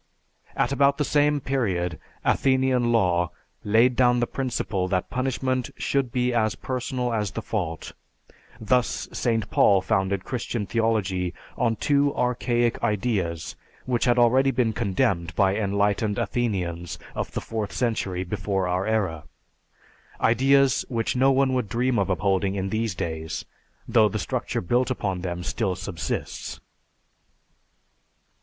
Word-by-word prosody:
At - - +1
about 140 0 +3
the 150 - 0
same 145 0 +2
period 95 - -1 0.3
Athenian 130 -3 +2
law 90 -6 +2 0.3
laid 115 +4 +4
down 125 -1 +4
the 120 - +2
principle 115 -8 -2
that 95 -1 -1
punishment 130 -1 -1
should 135 -3 0
be 125 0 0
as 110 -2 +1
personal 125 -1 -3
as 105 -3 0
the 115 - -5
fault, 85 -7 -3 0.7
thus 125 +3 0
St. 115 -3 0
Paul 100 -1 +5
founded 95 0 0
Christian 120 -3 -3
Theology 95 -6 0 0.2
on 115 -2 +1
two 140 +3 +2
archaic 120 -1 0
ideas 100 -7 -1 0.3
which 125 -1 0
had 120 -1 +3
already 130 +3 +4
been 120 -4 +1
condemned 90 -3 0
by 95 -1 +3
enlightened 100 0 0
Athenians 90 -8 -2 0.2
of - - -4
the - - -1
fourth 110 -3 -4
century 100 -7 -1
before 95 0 -2
our 90 +2 -1
era, 95 -9 -1 0.9
ideas 135 +3 +4
which 115 -2 -1
no 135 +2 +4
one 135 0 +2
would 125 -5 -1
dream 120 +2 +1
of 100 - 0
upholding 95 +2 +1
in 95 0 -2
these 110 -2 -1
days, 80 -1 -4 0.4
though 110 -2 +4
the 110 - -3
structure 100 - -2
built 120 +9 +1
upon 95 -7 -2
them 90 -1 -4
still 95 -1 -1
subsists." 85 -6 -5
110 Hz, 135 wpm, -25 LUFS, 95-125 Hz, 0.9 s, Paul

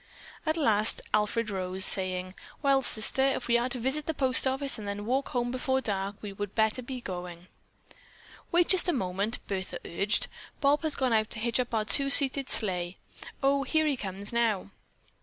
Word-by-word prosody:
At 315 +1 +1
last 220 -7 +1
Alfred 215 +1 0
arose, 185 0 +3
saying: 185 -1 +2 0.3
"Well, 275 -1 +3
Sister, 230 +1 +3
if 270 0 0
we 235 0 +3
are 245 +2 -2
to 255 - 0
visit 270 +5 -1
the 320 - -2
post 265 -1 +2
office 270 -1 0
and 205 - -8
then 200 +1 -5
walk 265 +4 -1
home 245 -1 -2
before 260 +1 -1
dark, 200 -4 -3
we 205 -1 -7
would 205 0 -7
better 220 +3 0
be 255 0 -7
going." 180 -2 -8 1.0
"Wait 345 0 +3
just 375 -1 +4
one 350 - 0
moment," 195 +3 -3
Bertha 190 -2 -5
urged. 200 +6 -1 0.3
"Bob 285 0 +2
has 315 -2 +1
gone 260 -3 0
out 215 -1 +1
to 225 - -1
hitch 235 +1 0
up 250 - -2
our 215 -1 -1
two 275 +7 +4
seated 275 -1 +6
sleigh. 180 -4 -1 0.5
Oh, 275 +1 +2
here 315 +3 0
he 295 -2 0
comes 200 -1 -5
now." 220 -4 -1
230 Hz, 190 wpm, -27 LUFS, 200-270 Hz, 1.0 s, seated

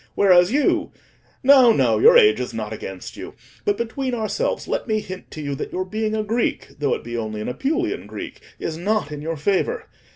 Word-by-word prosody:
Whereas 180 -1 +5
you—no, 270 -2 +2
no, - - +2
your 480 +3 +8
age 425 -3 +5
is - - -4
not - - -4
against - - -8
you; - - -8 0.3
but 410 -1 +1
between 250 +2 -2
ourselves, 230 - -2
let - - -2
me 215 -1 +1
hint 185 -2 -9
to 155 - -7
you 140 -1 -3
that 135 - -5
your 185 +1 -2
being 215 +2 -2
a 215 - -1
Greek, 225 +3 -1
though 145 -2 +1
it - - -8
be 120 0 -6
only 110 -2 -3
an 105 - -4
Apulian 325 - -2
Greek, - - -8 0.2
is 160 - -4
not 205 -4 0
in 150 -1 -6
your 165 +1 -3
favour. 200 - 0
215 Hz, 200 wpm, -22 LUFS, 165-270 Hz, 0.3 s, your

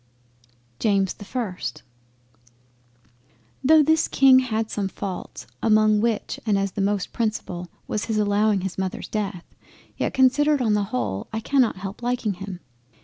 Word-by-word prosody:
JAMES 195 -3 +2
the 205 - -12
1st 210 -6 -4 1.8
Though 310 +3 +6
this 315 +2 +3
King 265 -1 +6
had 225 -3 -2
some 200 -2 -1
faults, 190 -1 -6 0.2
among 215 -1 +4
which 225 -2 -1
and 210 -3 +2
as 195 0 -1
the 200 - -3
most 200 -1 -1
principal, 210 -6 -3 0.2
was 210 - -2
his 220 -2 -1
allowing 205 -1 +2
his 190 0 -4
Mother's 190 -1 -3
death, 200 -5 -3 0.5
yet - - -1
considered 280 +3 +4
on 225 -4 +2
the 205 -1 +1
whole 105 - -3
I 220 - -2
cannot 255 0 +2
help 195 +3 -7
liking 240 -3 -1
him. 185 -1 -8
210 Hz, 145 wpm, -24 LUFS, 195-235 Hz, 1.8 s, Though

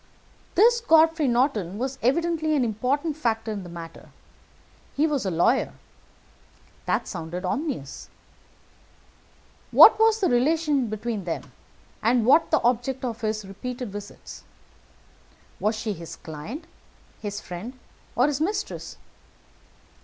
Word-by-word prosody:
"This 470 +5 +5
Godfrey 320 - +4
Norton 235 - +1
was 260 +3 -3
evidently 315 +4 +1
an 265 -4 +2
important 265 +8 -1
factor 225 -6 -1
in 205 -2 -4
the 180 - -10
matter. 165 -1 -10 0.9
He 295 - +3
was 285 -9 -1
a - - +1
lawyer. 180 +10 +2 1.1
That - - 0
sounded 175 +1 -5
ominous. 260 - -4 1.6
What - - +8
was 445 0 +4
the 385 - +2
relation 285 +1 +2
between 215 -2 -4
them, 170 - -5 0.5
and 230 0 +2
what 305 +7 +5
the 315 - +2
object 245 +2 0
of 230 -2 -4
his 215 -1 -2
repeated 245 +3 -6
visits? 205 0 -9 1.2
Was 215 +2 +1
she 215 -1 -3
his 170 -2 -9
client, 165 - -8 0.6
his 205 -1 -4
friend, 210 +10 -8 0.4
or 250 - +4
his 290 0 -1
mistress? 400 +5 -3
245 Hz, 125 wpm, -25 LUFS, 205-300 Hz, 1.6 s, What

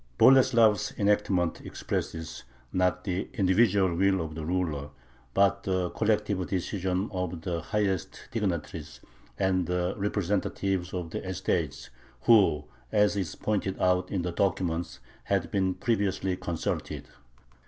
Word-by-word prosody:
Boleslav's 115 -5 +5
enactment 100 -4 +1
expresses, 80 0 -4 0.3
not 90 0 +1
the 95 -1 -2
individual 95 -1 +3
will 95 +2 +2
of 80 -2 -4
the 80 0 -5
ruler, 80 -4 -1 0.5
but 100 0 +3
the 95 -2 -1
collective 105 -4 0
decision 95 +1 -1
of 90 -3 -3
the 85 -1 -2
highest 95 -1 -2
dignitaries 85 -7 -3 0.4
and 95 -3 +1
the 90 0 0
representatives 95 -2 -1
of 85 -3 -4
the - - -4
estates, 90 -8 -2 0.3
who, 100 -10 +5 0.3
as 105 -1 +3
is 95 -6 -2
pointed 100 -3 -1
out 90 0 +2
in 95 -3 -1
the 90 - -2
document, 85 -2 -1 0.3
had 90 -4 0
been 95 -2 +1
previously 100 -4 0
consulted. 85 -3 -3
95 Hz, 120 wpm, -28 LUFS, 90-100 Hz, 0.5 s, Boleslav's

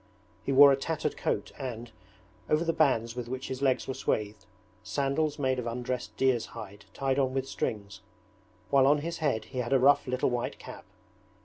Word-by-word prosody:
He - - -2
wore 140 +1 +9
a - - +4
tattered 155 +3 -2
coat - - -2
and, 120 -3 -6 0.6
over 155 +2 +2
the 165 - +1
bands 120 -7 +2
with 125 -1 -5
which 130 +1 -5
his 130 0 -5
legs 135 -2 +1
were 135 - -2
swathed, 105 -6 -2 0.3
sandals 145 +2 -1
made 130 -3 0
of 120 - -4
undressed 125 +1 -4
deer's 130 -3 +2
hide 100 -2 -9
tied 135 0 -1
on 130 -1 0
with 135 0 -1
strings; 100 -5 -4 0.7
while 135 -1 +5
on 145 +1 +4
his 170 0 -4
head 130 -9 0
he 130 - -6
had 120 +1 -1
a 135 - +5
rough 140 +2 +4
little 130 0 0
white 120 -1 -2
cap. - - -11
130 Hz, 190 wpm, -29 LUFS, 120-140 Hz, 0.7 s, wore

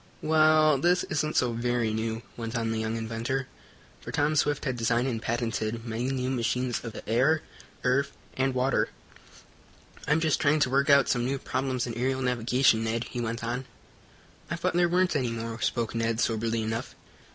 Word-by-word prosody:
"Well, 155 -2 +5
this 175 +4 +3
isn't 155 0 0
so 125 -2 +2
very 120 -1 0
new," 110 +1 -2
went 115 0 -5
on 115 -1 -1
the 110 - -1
young 110 0 -2
inventor, 115 +4 -2 0.6
for - - -7
Tom 150 0 +1
Swift 145 -1 +1
had 130 -3 -1
designed 120 +2 +1
and 115 -4 -2
patented 115 -1 -2
many 115 +2 -2
new 130 -1 -1
machines 125 0 -1
of 115 -2 -6
the - - -9
air, 135 +8 +3 0.4
earth 135 +2 +2 0.2
and 135 0 0
water. 130 +1 +1 1.2
"I'm 150 +2 +3
just 160 -2 +1
trying 150 +1 +3
to 130 - +2
work 140 +2 +2
out 140 -2 +6
some 120 - +1
new 135 +3 -1
problems 130 -1 -2
in 120 - -4
aerial 130 +3 -1
navigation, 125 -1 +2
Ned," 115 +1 -1
he 120 - -3
went 115 0 -3
on. 120 +3 -3 0.8
"I - - -1
thought - - -1
there 175 0 +3
weren't 180 -1 +2
any 130 -4 +1
more," 115 0 -5
spoke 115 -3 -1
Ned, 115 -1 0
soberly 115 -1 0
enough. 110 +1 -4
125 Hz, 185 wpm, -28 LUFS, 115-140 Hz, 1.2 s, out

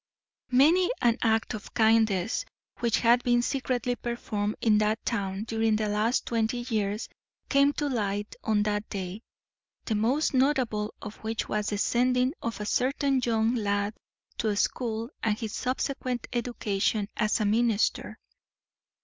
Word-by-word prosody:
Many 315 +9 +5
an 235 0 +3
act 225 -1 +1
of 210 -2 -8
kindness 220 - +3 0.4
which 235 -2 +1
had 240 +1 +5
been 240 -1 +2
secretly 250 -2 -1
performed 215 -4 -3
in 215 -2 +3
that 215 +1 0
town 195 -3 -2
during 225 -1 +1
the 215 0 0
last 215 +4 +1
twenty 235 +1 -1
years 210 0 -1 0.4
came 280 0 +4
to 295 - -1
light 205 -5 -2
on 210 -1 +2
that 210 0 -2
day, 190 +1 -5 0.6
the 225 - -1
most 245 +9 +1
notable 255 -6 +1
of 210 - -7
which 220 0 -3
was 210 0 -1
the 205 - -2
sending 250 +4 +2
of 230 -2 -4
a 210 - -4
certain 270 +4 +1
young 225 0 +2
lad 205 -2 0 0.5
to 215 -2 +1
school 230 +2 -1
and 215 -1 +1
his 220 -3 -5
subsequent 255 -1 -2
education 220 -4 -1
as 215 +1 +1
a 215 - +1
minister. 225 0 +1
225 Hz, 145 wpm, -28 LUFS, 210-245 Hz, 0.6 s, Many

